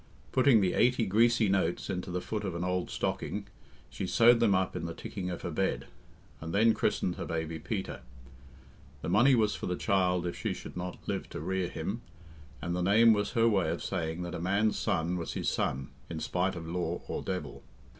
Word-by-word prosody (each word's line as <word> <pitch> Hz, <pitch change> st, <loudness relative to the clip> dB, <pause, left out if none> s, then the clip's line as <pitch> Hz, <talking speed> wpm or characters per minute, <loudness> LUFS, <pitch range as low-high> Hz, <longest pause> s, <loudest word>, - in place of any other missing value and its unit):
Putting 130 Hz, -4 st, +5 dB
the 90 Hz, -2 st, +2 dB
eighty 125 Hz, -2 st, +3 dB
greasy 115 Hz, +3 st, +4 dB
notes 95 Hz, -3 st, 0 dB
into 90 Hz, -2 st, -3 dB
the 90 Hz, 0 st, -2 dB
foot 105 Hz, +2 st, -3 dB
of 95 Hz, -4 st, -3 dB
an 85 Hz, -, -2 dB
old 90 Hz, 0 st, -1 dB
stocking, -, -, -2 dB, 0.4 s
she -, -, -5 dB
sewed 120 Hz, +1 st, +6 dB
them 105 Hz, -4 st, +4 dB
up 95 Hz, 0 st, 0 dB
in -, -, -3 dB
the 85 Hz, -, -5 dB
ticking 90 Hz, -2 st, -5 dB
of 90 Hz, -, -5 dB
her -, -, -3 dB
bed, -, -, -1 dB, 0.5 s
and 80 Hz, +3 st, -5 dB
then 110 Hz, +2 st, +5 dB
christened 90 Hz, -, 0 dB
her -, -, -4 dB
baby 80 Hz, -1 st, -3 dB
Peter. 100 Hz, +1 st, -4 dB, 1.0 s
The -, -, -2 dB
money 120 Hz, +9 st, +5 dB
was 110 Hz, -3 st, +2 dB
for -, -, -5 dB
the 90 Hz, -, 0 dB
child 90 Hz, -2 st, +1 dB
if 85 Hz, -, -3 dB
she -, -, -2 dB
should -, -, -9 dB
not 90 Hz, 0 st, -4 dB
live -, -, -3 dB
to -, -, -6 dB
rear 95 Hz, +3 st, -1 dB
him, 100 Hz, +8 st, -4 dB, 0.6 s
and 85 Hz, +1 st, -1 dB
the 90 Hz, -, -1 dB
name 110 Hz, +5 st, +6 dB
was 105 Hz, +1 st, -1 dB
her 115 Hz, -2 st, +4 dB
way 95 Hz, -7 st, +2 dB
of 85 Hz, -, -3 dB
saying 85 Hz, -2 st, -2 dB
that 85 Hz, -1 st, -5 dB
a 85 Hz, -, -4 dB
man's 100 Hz, +4 st, +2 dB
son 85 Hz, +2 st, 0 dB
was 85 Hz, -, -4 dB
his -, -, -1 dB
son 65 Hz, 0 st, -1 dB, 0.2 s
in 80 Hz, -, -4 dB
spite 90 Hz, +3 st, 0 dB
of 80 Hz, -2 st, -6 dB
law 90 Hz, +1 st, -2 dB
or -, -, -3 dB
devil. 90 Hz, -8 st, -4 dB
90 Hz, 210 wpm, -30 LUFS, 85-105 Hz, 1.0 s, sewed